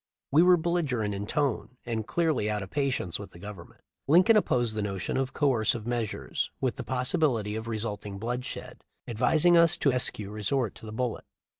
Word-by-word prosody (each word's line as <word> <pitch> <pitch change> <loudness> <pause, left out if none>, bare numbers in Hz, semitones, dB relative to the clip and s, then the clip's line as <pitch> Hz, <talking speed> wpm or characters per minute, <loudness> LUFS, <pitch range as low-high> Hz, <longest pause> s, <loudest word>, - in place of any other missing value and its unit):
We 150 +4 +6
were 180 0 +6
belligerent 150 -11 0
in 100 +1 -4
tone, 135 -2 -1
and 115 -3 -3
clearly 155 -11 +1
out 105 -1 -1
of 95 - -10
patience 135 - -1
with 100 -2 -9
the - - -12
Government. 100 -3 -10 0.3
Lincoln 180 +10 +6
opposed 120 - +2
the 110 - -2
notion 100 -2 -3
of 130 0 0
coercive 120 -6 +1
measures 120 -3 -2
with 130 -3 -1
the - - -4
possibility 125 -4 0
of 110 +1 -5
resulting 105 -3 -4
bloodshed, 125 +4 -5 0.2
advising 150 +9 +3
us 170 0 +5
to 140 - +2
eschew 110 -5 0
resort 110 +2 -1
to 110 - -12
the - - -6
bullet. 120 +1 -3
120 Hz, 175 wpm, -28 LUFS, 105-140 Hz, 0.3 s, We